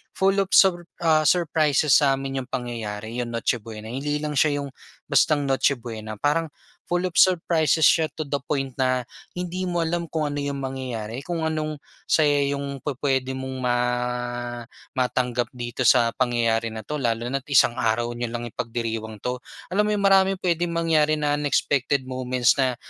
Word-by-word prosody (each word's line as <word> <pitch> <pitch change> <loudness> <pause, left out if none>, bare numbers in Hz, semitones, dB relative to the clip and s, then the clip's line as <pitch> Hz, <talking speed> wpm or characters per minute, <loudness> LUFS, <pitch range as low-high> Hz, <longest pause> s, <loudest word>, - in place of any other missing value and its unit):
full 195 +1 +2
of 195 - +1
sur 175 -3 +5 0.2
ah, 155 -2 +4
surprises 155 -4 +2
sa'min 135 -1 0
'yong 125 - -10
pangyayari, 115 -2 -4
'yong 120 -1 -3
Noche 115 +1 0
Buena. 110 0 -9
Hindi 145 +4 -2
lang 150 -1 -3
siya 145 -2 +2
'yong 140 - -6 0.4
bastang 145 +2 +3
Noche 135 +1 +2
Buena, 110 -2 -7
parang 150 +7 +1 0.4
full 175 +1 -1
of 175 - -9
surprises 165 -3 +4
siya 160 -2 +3
to 155 -2 -6
the 145 - 0
point 135 -3 -2
na 130 -2 0 0.2
hindi 180 +1 -4
mo 175 -1 -1
alam 170 +1 0
kung 155 -2 0
ano 145 0 -4
yung 140 -1 -3
mangyayari, 130 -3 -5
kung 170 +2 -3
anong, 155 -1 -3 0.3
saya 145 -2 +3
'yong 140 -1 -3
pupuwede 135 -2 -1
mong 130 0 -5
ma 125 -1 +2 1.2
matanggap 125 -2 0
dito 120 0 -5
sa 120 -2 +5
pangyayari 115 -2 +1
na 110 0 -7
'to 150 +7 -4
lalo 115 -3 0
na't 135 0 -3
isang 135 -3 +5
araw 120 +1 0
niyo 120 0 -3
lang 120 0 -4
ipagdiriwang 115 -1 -4
'to. 125 0 -2 0.3
Alam 205 +3 +2
mo - - +1
yun, 200 - -2
maraming 195 -1 +4
pwedeng 170 -1 0
mangyari 155 -2 +2
na 150 -1 0
unexpected 140 -2 +1
moments 130 -1 +1
na 130 -2 +2
135 Hz, 170 wpm, -24 LUFS, 120-155 Hz, 1.2 s, sur